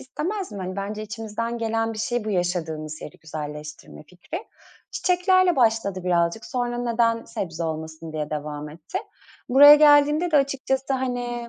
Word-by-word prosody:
istemez 360 +9 -4
mi? 205 - -6
Hani, 185 0 -5
bence 205 +2 -4
içimizden 225 +2 -4
gelen 225 0 -1
bir 220 - -8
şey 240 +1 -1
bu 215 - -3
yaşadığımız 165 -4 -2
yeri 150 - -10
güzelleştirme 150 -1 -8
fikri. 180 - -8 0.5
Çiçeklerle 365 0 +2
başladı 220 -6 +1
birazcık. 175 +3 +1
Sonra 245 -1 -2
"Neden 230 -1 +1
sebze 165 -2 -5
olmasın?" 160 0 -5
diye 155 -1 -4
devam 150 0 -5
etti. 155 +2 -6 0.5
Buraya 285 +3 +10
geldiğimde 295 +3 +5
de 305 - +4
açıkçası 270 -1 0
hani 245 -2 -3
225 Hz, 145 wpm, -24 LUFS, 165-265 Hz, 0.5 s, Buraya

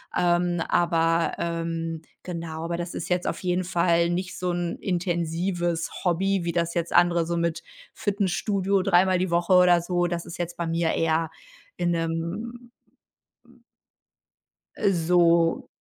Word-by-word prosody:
Ähm, 175 -1 +2
aber, 165 -1 +2
ähm, 165 -1 -3 0.2
genau, 165 -2 -6
aber 170 0 -2
das 175 0 -5
ist - - -5
jetzt 180 0 0
auf - - -3
jeden 180 0 0
Fall 170 -1 +2
nicht 180 +1 -3
so 180 -1 -1
'n 175 -1 -2
intensives 175 -1 -1 0.2
Hobby, 190 +2 +1
wie 170 - 0
das 170 0 -1
jetzt 170 -1 -2
andere 175 -1 +4
so 170 +1 -2
mit 170 0 -1 0.3
Fitnessstudio 195 -1 0
dreimal 185 +1 +4
die 180 -1 -1
Woche 175 +2 +2
oder 180 -1 +6
so. 175 0 0
Das 170 -1 -3
ist 170 - -8
jetzt 175 0 -4
bei 170 -1 -3
mir 165 0 0
eher 160 0 0 0.5
in 175 -1 0
'nem 170 +9 -3 2.1
äh, 200 -2 +2
so 170 -1 +3
175 Hz, 145 wpm, -25 LUFS, 165-180 Hz, 2.1 s, oder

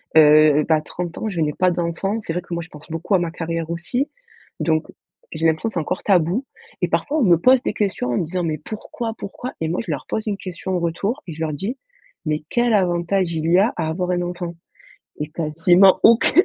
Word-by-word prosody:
heu, 150 -1 +7
bah 155 - +4
30 175 +2 -6
ans, - - -3
je 180 -6 -2
n'ai 150 -1 +1
pas 185 +3 +2
d'enfant. 175 +5 -2
C'est 165 - -4
vrai 180 - -2
que 175 - -8
moi 170 - -2
je 175 - -10
pense 150 +2 -13
beaucoup 165 +5 0
à 185 - +4
ma 170 -2 -2
carrière 165 -1 -4
aussi 245 - -2 0.5
donc, 160 -1 +1 0.5
j'ai 160 0 -2
l'impression 160 +8 +1
que - - -14
c'est - - +1
encore 175 +4 -3
tabou 185 - +2 0.4
et - - +2
parfois 305 +2 0
on - - +3
me 175 -4 +5
pose 255 +7 +4
des - - 0
questions 190 -12 -1
en 120 - 0
me - - 0
disant: 180 +2 -2
«Mais, 155 -2 -1
pourquoi? 220 - -6
Pourquoi?» 245 +5 -6
Et 160 - 0
moi 175 - -1
je - - -9
leur - - -4
pose 220 - -2
une 205 - 0
question 185 0 -4
en - - +1
retour 195 - -2
et 170 - -5
je 155 - -11
leur 155 -1 -1
dis: 200 - -3 0.5
«Mais 155 0 -1
quel 240 -1 +2
avantage, 180 -1 +1
il 160 +1 -1
y 180 - +6
a 215 +4 +3
à 165 -2 -1
avoir 180 +3 -2
un 175 0 0
enfant?» 175 -1 -4 0.7
Et 150 - -2
quasiment 170 +4 +4
aucun 230 0 +6
175 Hz, 235 wpm, -21 LUFS, 160-195 Hz, 0.7 s, heu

